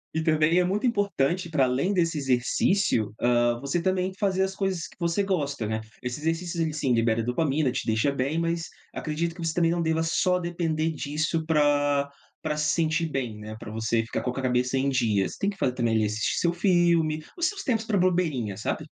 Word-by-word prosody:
E 160 - 0
também 160 +2 +3
é - - +4
muito 205 +7 0
importante, 185 - 0
para 140 -5 +3
além 135 +11 0
desse 165 -4 +1
exercício, 125 - +1
hã, 120 -1 +2
você 140 +6 -1
também 185 +1 0
fazer 190 -2 +1
as 190 0 -2
coisas 190 -4 -2
que - - -19
você 170 +3 0
gosta, 145 - -1
né. 110 0 -2 0.2
Esse 125 +4 -4
exercício, 165 +1 -1
ele, 160 -1 0
sim, 135 -4 0
libera 115 0 +2
dopamina, 135 +3 +1
te - - -3
deixa 115 +6 +1
bem, 140 +5 -1
mas 165 0 -1 0.2
acredito 165 +2 -2
que 170 - -7
você 160 - 0
também 170 -1 +2
não 170 0 0
deva 160 0 +1
só 180 +2 +1
depender 165 -2 -1
disso 155 +2 -2
pra 145 -2 +2 0.3
pra 150 - -2
se 150 0 +1
sentir 165 0 +1
bem, 125 -7 -3
né, 110 +1 -7
pra 110 - -8
você 115 +1 0
ficar 115 - -3
com 125 - -2
a - - -2
cabeça 125 +1 +1
em 135 +1 +1
dias. 110 -8 +1
Tem 200 - 0
que 195 - -7
fazer 125 -6 0
também, 115 -3 0
ali, 110 -1 +2
assistir 110 +1 -1
seu 170 0 +1
filme, 170 -4 +2
os 345 0 +1
seus 395 +1 -4
tempos 225 -4 0
pra 210 -3 +1
bobeirinha, 165 - +1
sabe? - - -3
155 Hz, 210 wpm, -26 LUFS, 125-175 Hz, 0.3 s, é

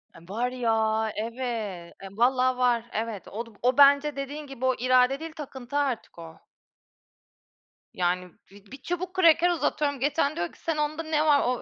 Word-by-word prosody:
E, - - -13
var 240 +5 -1
ya, 220 -3 0
evet. 220 -6 -4
E, 195 - -9
vallaha 255 +4 +2
var. 245 -2 +2
Evet, 220 -2 -4
o 230 +3 -5
du 230 - -16
o 250 +1 +2
bence 285 0 +6
dediğin 285 +2 -6
gibi, 260 -2 -5
"O 260 - +2
irade 255 +2 +3
değil, 325 0 -7
takıntı 275 -3 -6
artık 270 -10 -2
o." 165 -1 -11 1.5
Yani 180 0 -1 0.2
bi 200 0 -16
bir 275 - -8
çubuk 360 +2 -4
kraker 350 -1 +5
uzatıyorum 295 -5 0
geçen, 290 +2 0
diyor 175 - -1
ki: - - -21
"Sen 325 -2 -2
onda 300 +2 -1
ne 310 -1 0
var?" 295 -2 +5
o 250 0 -1
255 Hz, 175 wpm, -26 LUFS, 225-295 Hz, 1.5 s, bence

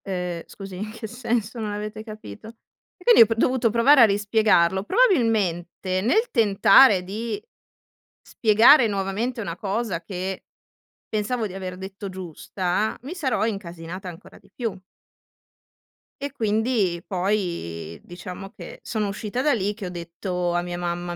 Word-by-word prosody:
"Eh, 180 -3 -3
scusi, 195 -2 -9
in 210 +3 -5
che 225 0 -8
senso 235 -1 -2
non 215 -2 -3
avete 210 +1 -5
capito?" 215 - -10 0.5
E 360 - -18
quindi 475 +2 +7
è - - +10
p 225 - -2
dovuto 250 0 +2
provare 235 +5 +5
a - - +10
rispiegarlo. 200 -3 +2
Probabilmente, 205 - +1
nel 435 - +2
tentare 210 -1 +6
di 225 - -4 0.9
spiegare 230 +4 +6
nuovamente 210 +4 -2
una 170 -6 -4
cosa 200 -3 -2
che 185 +1 -5 0.6
pensavo 220 +2 -1
di 190 - -8
aver 185 -1 -6
detto 190 +1 -7
giusta, 185 +2 -3
mi 285 +7 -6
sarò 265 - 0
incasinata 185 -3 -6
ancora 175 -1 -12
di - - -25
più. 230 -6 -3 1.5
E 285 - -3
quindi 215 -5 0
poi 175 - -2
diciamo 180 +2 -9
che - - -11
sono 215 -2 -2
uscita 210 +4 -3
da 295 +1 +3
lì 205 -2 0
che 205 -3 -7
ho - - -5
detto 175 +1 -3
a 175 - +1
mia 175 0 -5
mamma, 175 0 -3
205 Hz, 145 wpm, -24 LUFS, 180-225 Hz, 1.5 s, è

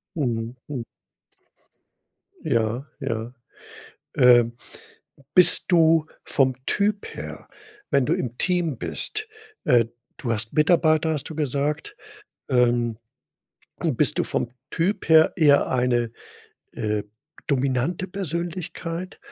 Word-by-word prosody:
Mhm, 120 -4 -2
mhm. 130 -5 -5 1.6
Ja, 115 +3 0 0.2
ja, 115 -2 -3 0.8
äh, 120 -1 +6 0.9
bist 180 -1 +7
du 165 -3 +4 0.2
vom 130 -2 +2
Typ 205 0 -1
her, - - -8 0.4
wenn 135 -3 +2
du - - +1
im 120 -1 -4
Team 175 -8 0
bist 430 0 -3 0.4
äh, 120 -2 +4 0.3
du 120 -4 -2
hast 110 0 -2
Mitarbeiter, 155 0 +3
hast 150 +1 -4
du - - -6
gesagt. 145 +1 -2 0.5
Ähm, 120 -2 +2 0.9
bist - - +1
du - - +3
vom 120 - -2 0.2
Typ 185 +1 -1
her 160 0 +6
eher 145 -5 +4
eine, 120 -2 0 0.6
äh, 105 -1 -2 0.4
dominante 140 +6 0
Persönlichkeit? 170 -1 -5
140 Hz, 105 wpm, -24 LUFS, 120-165 Hz, 1.6 s, bist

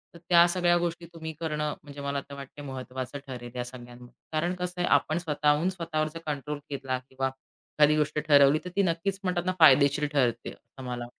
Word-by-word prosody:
तर 170 - -11
त्या 170 0 +7
सगळ्या 175 -1 +2
गोष्टी 170 0 -2
तुम्ही 160 -1 -6
करणं 150 -2 -2
म्हणजे 145 -1 -10
मला 140 0 -2
तर 140 - -8
वाटत 140 +1 -10
महत्त्वाचं 130 0 -6
ठरेल 120 -2 -7
ह्या 125 -1 -3
सगळ्यांमध्ये. 120 0 -12 0.2
कारण 170 +3 0
कसं 180 0 -5
आहे - - +1
आपण 155 - -2
स्वतःहून 150 +1 +1
स्वतःवर 165 -4 -2
जर 165 - -6
कंट्रोल 150 0 -4
घेतला 130 -2 -2
किंवा 135 0 -1
एखादी 150 +3 0
गोष्ट 150 0 0
ठरवली 145 0 +6
तर 180 - -4
ती 200 - +3
नक्कीच 185 +3 -1
म्हणतात 180 -1 -1
ना 185 - +1
फायदेशीर 145 -1 +6
ठरते 120 -4 +1
असं 135 - -14
मला 120 -1 -4
150 Hz, 195 wpm, -28 LUFS, 135-170 Hz, 0.2 s, त्या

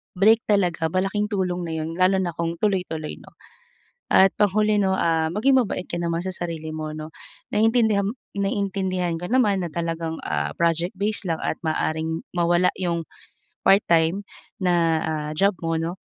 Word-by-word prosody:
break 215 +4 +5
talaga 180 -6 +2
malaking 195 +4 0
tulong 180 -3 -1
na 160 - -3
'yun 160 0 -3
lalo 185 +1 +4
na 175 -2 -1
kung 170 0 -2
tuloy-tuloy 180 -7 -1
'no. - - -17 0.7
At 190 0 +5
panghuli 210 +1 +3
'no, 190 -1 +2
ah, 165 -2 +1
maging 260 +7 +4
mabait 210 -5 -2
ka 170 - -3
naman 170 +1 -1
sa 190 - -2
sarili 165 -3 -5
'no 155 0 -5 0.4
naiintindiham 220 -1 +2 0.2
naiintindihan 190 -3 -1
ko 180 - -5
naman 220 -6 +3
na - - -3
talagang, 165 -1 -3
ah, 75 -1 -1
project-base 185 +5 0
lang 165 -1 -1
at - - -1
maaaring 160 0 -1
mawala 175 +1 +3
'yung 170 -2 -1 0.6
part-time 180 -1 +3 0.4
na, 180 -2 +2 0.3
ah, 155 -1 -2
job 195 +4 +2
mo, 165 0 0
'no. 170 +3 -3
180 Hz, 155 wpm, -23 LUFS, 165-200 Hz, 0.7 s, break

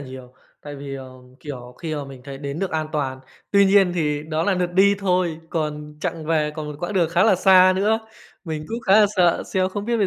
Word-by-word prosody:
nhiều 130 -1 -11 0.3
tại 145 -1 -8
vì, 140 0 -7
ờ, 130 -1 -9 0.3
kiểu, 125 -4 -8
khi 155 -2 -3
mà 145 -1 -4
mình 135 -2 -11
thấy 135 -1 -8
đến 140 +2 -5
được 195 -1 -2
an 155 -1 -2
toàn. 135 -3 -2 0.3
Tuy 200 0 +5
nhiên 195 -2 +4
thì 150 -3 -1
đó 155 +1 0
là 195 +1 +1
lượt 180 -1 -1
đi 200 +2 +5
thôi 180 -4 0
còn 150 -2 -4
chặng 160 -1 -3
về, 155 -2 +1
còn 155 - -5
một 150 - -6
quãng 175 +4 -3
đường 175 -4 +2
khá 170 +2 +3
là 220 - +5
xa 185 0 +6
nữa, 215 +3 +2 0.5
mình 155 -3 -5
cũng 230 +1 -4
khá 200 +2 +6
là 210 - +6
sợ 175 -2 +3
xem 185 0 +1
không 205 +1 -5
biết 235 0 0
bây 205 -3 +2
165 Hz, 245 wpm, -22 LUFS, 145-190 Hz, 0.5 s, xa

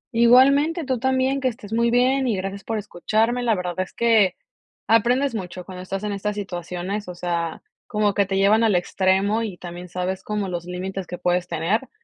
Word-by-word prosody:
Igualmente 275 +8 +5
tú 260 -3 -1
también, 265 +1 +1
que 260 - +1
estés 225 -3 -5
muy 235 +1 +2
bien 255 +2 +2
y 220 -5 0
gracias 195 +1 -5
por 225 - -2
escucharme. 215 +4 0
La 235 -3 +2
verdad 180 -2 -3
es 185 - -3
que 225 -5 +3 0.5
aprendes 245 +4 +3
mucho 180 -4 -6
cuando 185 -1 -8
estás 195 +2 -5
en 210 - -2
estas 205 +1 -3
situaciones, 180 +1 -4
o 180 - -7
sea, 170 -2 -3 0.2
como 210 -2 +1
que 200 -1 +1
te 195 0 -1
llevan 210 +3 +4
al 215 -4 +3
extremo 190 +4 +1
y 210 -6 -4
también 175 0 -8
sabes 185 +2 -3
como 210 -2 -2
los 175 -1 -4
límites 185 +1 -5
que 180 - -6
puedes 180 0 0
tener, 175 +10 -1
200 Hz, 195 wpm, -23 LUFS, 180-235 Hz, 0.5 s, Igualmente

